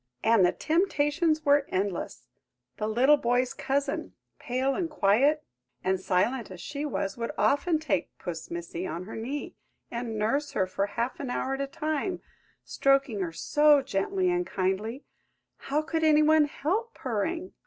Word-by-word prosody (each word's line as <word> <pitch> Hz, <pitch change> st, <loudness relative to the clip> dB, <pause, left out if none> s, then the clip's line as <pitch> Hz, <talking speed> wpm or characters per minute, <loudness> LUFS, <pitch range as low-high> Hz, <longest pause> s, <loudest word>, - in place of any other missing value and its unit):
And 225 Hz, -3 st, +5 dB
the 175 Hz, -, +5 dB
temptations 315 Hz, -2 st, +1 dB
were 285 Hz, -1 st, +4 dB
endless. 190 Hz, -1 st, -3 dB, 0.5 s
The 215 Hz, -, -2 dB
little 255 Hz, +7 st, +5 dB
boy's 245 Hz, 0 st, +1 dB
cousin, 280 Hz, +1 st, -2 dB, 0.2 s
pale, 265 Hz, -1 st, 0 dB
and 345 Hz, 0 st, -2 dB
quiet, 285 Hz, +5 st, +3 dB, 0.4 s
and 190 Hz, 0 st, +1 dB
silent 210 Hz, +6 st, 0 dB
as 185 Hz, -2 st, -9 dB
she 285 Hz, -, -4 dB
was, 195 Hz, -7 st, -3 dB
would 230 Hz, 0 st, -3 dB
often 315 Hz, +4 st, +2 dB
take 310 Hz, -2 st, -1 dB
Puss 165 Hz, -2 st, -6 dB
Missy 170 Hz, +1 st, -5 dB
on 170 Hz, -, -4 dB
her 205 Hz, -, -8 dB
knee, 260 Hz, +6 st, -4 dB, 0.4 s
and 235 Hz, -2 st, -4 dB
nurse 275 Hz, +8 st, 0 dB
her 190 Hz, -, +2 dB
for 195 Hz, +2 st, -2 dB
half 235 Hz, +4 st, -3 dB
an 275 Hz, -, -4 dB
hour 260 Hz, +2 st, -1 dB
at 270 Hz, -, -2 dB
a 275 Hz, -, -1 dB
time, 310 Hz, +5 st, -2 dB, 0.5 s
stroking 275 Hz, -5 st, +2 dB
her 180 Hz, -3 st, -2 dB
so 295 Hz, -, +4 dB
gently 360 Hz, -, 0 dB
and 355 Hz, 0 st, 0 dB
kindly–how 220 Hz, +8 st, -4 dB
could 320 Hz, +1 st, -2 dB
any 305 Hz, -1 st, +5 dB
one 310 Hz, 0 st, +5 dB
help 390 Hz, +11 st, -2 dB
purring? 325 Hz, -, -3 dB
275 Hz, 155 wpm, -28 LUFS, 210-305 Hz, 0.5 s, And